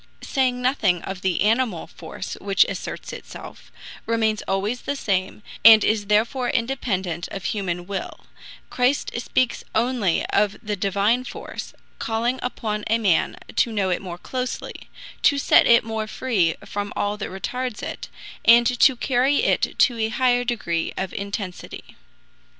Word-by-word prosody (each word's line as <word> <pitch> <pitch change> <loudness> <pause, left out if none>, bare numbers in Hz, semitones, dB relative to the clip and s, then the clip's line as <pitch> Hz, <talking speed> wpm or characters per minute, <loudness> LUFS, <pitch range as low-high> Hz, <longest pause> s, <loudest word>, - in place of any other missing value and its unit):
Saying 250 -2 0
nothing 210 - +1
of 190 -1 -6
the 185 -3 0
animal 220 -4 +1
force 165 +3 -8
which 195 -1 +4
asserts - - -6
itself, - - -11 0.4
remains 220 -2 +1
always 205 +6 -1
the 280 - -3
same, 195 -4 -2 0.2
and 220 0 +9
is 210 -2 +1
therefore 230 +4 +1
independent 200 -9 -2
of 195 - -7
human 175 -3 -2
will, 195 0 -5 0.5
Christ 255 +3 +1
speaks 255 0 0
only 225 -6 +1
of 205 0 +2
the 210 -1 -2
Divine 205 +5 +1
force, - - -8 0.2
calling 235 +3 -1
upon 215 -4 -3
a 225 - +3
man 200 -7 +1 0.2
to 235 - +3
know 200 -4 0
it 180 - -1
more 175 -3 -7
closely, 255 +6 -5 0.3
to 285 - +4
set 280 - +5
it 235 0 +6
more 220 -1 -3
free 205 -9 0
from 205 0 -4
all 205 0 -1
that 210 - -5
retards 250 +5 -4
it, - - -6 0.3
and 235 +1 +7
to 250 +2 +4
carry 260 +3 +2
it - - +1
to 240 -4 +3
a 220 0 +1
higher 245 +1 +2
degree 195 -9 -2
of 190 -1 -3
intensity. 200 -2 -6
220 Hz, 150 wpm, -23 LUFS, 195-245 Hz, 0.5 s, and